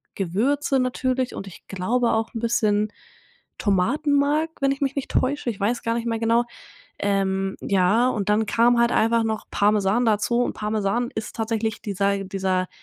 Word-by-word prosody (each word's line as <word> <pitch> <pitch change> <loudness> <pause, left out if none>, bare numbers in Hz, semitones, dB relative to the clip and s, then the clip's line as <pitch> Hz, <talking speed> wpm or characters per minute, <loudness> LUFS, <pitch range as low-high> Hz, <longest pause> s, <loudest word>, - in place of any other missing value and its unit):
Gewürze 260 - 0
natürlich 255 0 -1
und 195 - -6
ich 185 - -13
glaube 230 +6 0
auch 225 0 -1
'n 225 - -4
bisschen 215 -2 +1 0.7
Tomatenmark, 285 - +1
wenn 275 0 +3
ich 275 - -4
mich 275 0 0
nicht 280 - -4
täusche. 260 -1 0
Ich 200 - -11
weiß 230 +4 -1
gar 230 - 0
nicht 235 0 -3
mehr 225 -1 0
genau. 230 +1 +2 0.5
Ähm, 195 -1 0
ja 200 +6 +3
und 205 -4 -2
dann 215 +1 +3
kam 235 +3 +3
halt 235 0 +3
einfach 230 +1 +2
noch 220 -1 -3
Parmesan 205 +3 +2
dazu 225 +3 +2
und - - -1
Parmesan 215 +3 -1
ist 220 -1 -5
tatsächlich 220 -1 -2
dieser 200 -1 0
dieser, 185 -1 -1
225 Hz, 170 wpm, -23 LUFS, 200-245 Hz, 0.7 s, wenn